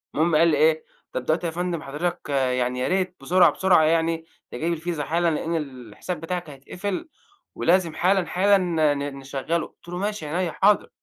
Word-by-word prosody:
المهم 160 +1 +2
قال 165 +2 +5
لي 150 -3 +3
إيه: 155 +1 +3 0.3
"طب 125 - -4
دلوقتي 160 +2 0
يا - - -3
فندم 175 -1 -2
حضرتك 150 +3 -4
يعني 125 -2 0
يا 125 - 0
ريت 185 -1 0
بسرعة، 180 +6 +5
بسرعة 185 -4 +4
يعني 165 0 +1 0.3
تجيب 170 +2 -1
الفيزا 165 -2 -3
حالًا 170 +3 +1
لإن 165 +2 -2
الحساب 135 - -5
بتاعك 175 -1 -4
هيتقفل، 180 - -5 0.5
ولازم 170 -1 +2
حالًا، 185 0 +2
حالًا 195 +4 +3
ن 175 -3 -2 0.2
ن 140 -1 -4
نشغله،" 140 +5 -2
قُلت - - -25
له: 175 - -4
"ماشي 205 -3 -3
عينيّا 170 +2 -1
حاضر." 205 +1 +3
165 Hz, 180 wpm, -24 LUFS, 150-180 Hz, 0.5 s, قال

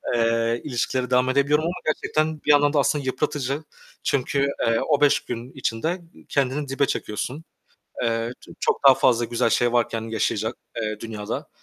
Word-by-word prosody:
eee, 115 0 +1
ilişkilere 125 -1 -1
devam 125 0 +3
edebiliyorum 140 +3 +2
ama 170 - -1
gerçekten 155 0 0
bir 150 - +5
yandan 145 0 +5
da 150 - +3
aslında 145 +1 +1
yıpratıcı 140 +1 -1 0.4
çünkü, 140 +1 +1 0.2
eee, 115 0 +3
o 145 -2 +3
5 145 0 +5
gün 120 +1 -6
içinde 120 -1 -2
ı 175 -2 -14
kendini 140 +1 0
dibe 135 +1 +1
çekiyorsun. 130 +6 -3 0.6
Eee, 115 0 0
ç - - -17
çok - - 0
daha 135 - +10
fazla 120 -2 +3
güzel 115 -1 0
şey 120 +2 +2
varken 115 -2 +1
yaşayacak, 110 +1 -1 0.2
eee, 110 -2 -3
dünyada. 105 -2 -5
130 Hz, 165 wpm, -24 LUFS, 115-145 Hz, 0.6 s, daha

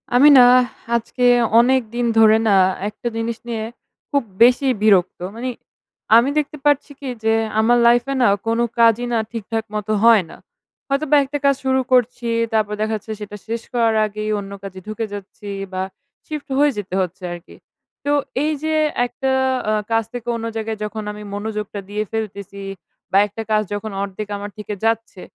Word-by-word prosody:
আমি 275 +4 +7
না 250 - +9 0.5
আজকে 235 +2 -2 0.4
অনেকদিন 240 -1 +1
ধরে 220 0 +7
না, 195 - +5 0.3
একটা 215 +3 -7
জিনিস 225 0 -2
নিয়ে 225 -2 -3 0.5
খুব 280 -2 +2 0.2
বেশিই 255 +2 +5
বিরক্ত। 190 -4 +3 0.2
মানি 250 +2 -3 0.7
আমি 240 +4 +4
দেখতে 300 0 -1
পারছি 290 0 +2
কি? 275 - -5
যে, 225 0 +3 0.3
আমার 240 +2 +4
লাইফ 240 0 +5
এ - - 0
না 245 - +5 0.2
কোন 230 +1 +1 0.2
কাজই 230 +1 +4
না - - +2
ঠিকঠাক 225 0 -3
মতো 210 0 -1
হয় 230 -4 +6
না। - - -11 0.5
হয়তোবা 280 +2 +2
একটা 290 +2 -3
কাজ 280 0 +4
শুরু 265 0 +2
করছি, 245 -1 +2 0.2
তারপর 215 -1 +1
দেখা 220 +1 0
যাচ্ছে 215 +1 -7
সেটা 210 0 -7
শেষ 230 +1 -3
করার 230 -2 +2
আগেই 215 0 -4
অন্য 200 0 -8
কাজে 190 -1 -8
ঢুকে 215 +1 -3
যাচ্ছি, 205 +1 -9 0.2
বা 185 - -2 0.5
শিফট 305 -2 -6
হয়ে 290 0 +4
যেতে 190 -2 -4
হচ্ছে 185 0 -5
আরকি। 175 +1 -12 0.5
তো 285 - +1 0.3
এই 305 - +1
যে 315 - 0 0.3
একটা 265 +2 -2 0.4
আ - - +2 0.2
কাজ 225 0 +2
থেকে 240 -1 -7
অন্য 230 0 -4
জায়গায় 220 0 -3
যখন 210 +1 -4
আমি 210 0 -9
মনোযোগটা 210 0 -4
দিয়ে 210 +1 -2
ফেলতেছি, 200 -3 -5 0.5
বা 195 - +4
একটা 210 +2 -7
কাজ 215 0 +4
যখন 210 +1 -4
অর্ধেক 200 +1 -5
আমার 205 +1 -7
থেকে 210 0 -5
যাচ্ছে, 225 -4 -1
225 Hz, 175 wpm, -20 LUFS, 210-245 Hz, 0.7 s, না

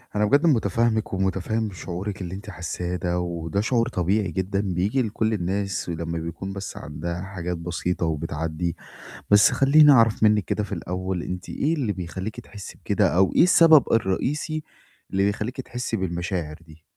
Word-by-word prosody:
أنا 105 0 +3
بجد 140 +9 +3
مُتفهّمِك 115 - +1
ومُتفهّم 95 +3 -1
شعورِك 95 +2 -5
اللي 90 +1 -5
أنتِ 105 +2 -9
حاسّاه 90 0 -4
ده، 90 0 -1
وده 85 +1 -2
شعور 115 +1 +1
طبيعي 95 0 0
جدًا 95 +3 -1
بييجي 100 +6 0
لكل 110 -1 -1
الناس 100 -1 -2
ولمّا 85 0 -3
بيكون 85 +4 -6
بس 100 0 -6
عندها 85 +4 -5
حاجات 90 -3 -4
بسيطة 85 +1 -2
وبتعدّي، 80 +1 -2 0.6
بس 105 0 +7
خلّيني 145 +2 +6
أعرف 115 -4 +4
منِّك 105 -2 +4
كده 105 - -1
في 100 - -9
الأول 90 0 -3
أنتِ 90 0 -6
إيه 155 +3 0
اللي 125 -9 -1
بيخلّيكِ 95 +5 -6
تحسّي 105 -4 -11
بكده - - +2
أو 95 -1 +4
إيه - - +7
السبب 165 -4 +7
الرئيسي 145 - 0 0.5
اللي 95 +1 +1
بيخلّيكِ 110 +6 -2
تحسّي 125 -2 -4
بالمشاعر 85 -4 -3
دي؟ 80 0 -17
95 Hz, 160 wpm, -24 LUFS, 85-110 Hz, 0.6 s, بس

